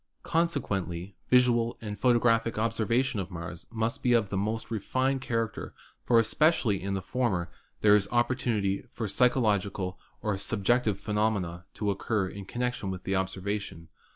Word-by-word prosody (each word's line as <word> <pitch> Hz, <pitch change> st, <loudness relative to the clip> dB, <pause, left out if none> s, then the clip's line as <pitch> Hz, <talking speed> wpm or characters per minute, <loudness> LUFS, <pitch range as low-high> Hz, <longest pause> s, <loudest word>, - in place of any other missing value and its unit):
Consequently 100 Hz, -, -1 dB
visual 120 Hz, -2 st, +4 dB
and 105 Hz, -2 st, -5 dB
photographic 115 Hz, -1 st, +3 dB
observation 115 Hz, +2 st, +1 dB
of 95 Hz, -, -4 dB
Mars 85 Hz, -1 st, -7 dB
must 115 Hz, 0 st, -2 dB
be 125 Hz, -, +3 dB
of 115 Hz, -4 st, +3 dB
the 100 Hz, -, -3 dB
most 110 Hz, +4 st, -2 dB
refined 130 Hz, +5 st, 0 dB
character, 115 Hz, -4 st, -3 dB, 0.3 s
for 120 Hz, -, +3 dB
especially 115 Hz, -, +3 dB
in 100 Hz, +1 st, -2 dB
the 95 Hz, -, -3 dB
former 95 Hz, -6 st, -1 dB, 0.3 s
there 105 Hz, -1 st, +7 dB
is 100 Hz, -1 st, +2 dB
opportunity 120 Hz, -5 st, +1 dB
for 110 Hz, -2 st, -4 dB
psychological 100 Hz, -6 st, +1 dB, 0.2 s
or 105 Hz, -3 st, -1 dB
subjective 105 Hz, 0 st, +1 dB
phenomena 105 Hz, -5 st, -1 dB
to 105 Hz, -2 st, 0 dB
occur 100 Hz, 0 st, -1 dB
in 100 Hz, +1 st, -8 dB
connection 125 Hz, -2 st, -2 dB
with 95 Hz, -1 st, -5 dB
the 95 Hz, -, -1 dB
observation. 95 Hz, -2 st, -3 dB
105 Hz, 145 wpm, -28 LUFS, 95-120 Hz, 0.3 s, there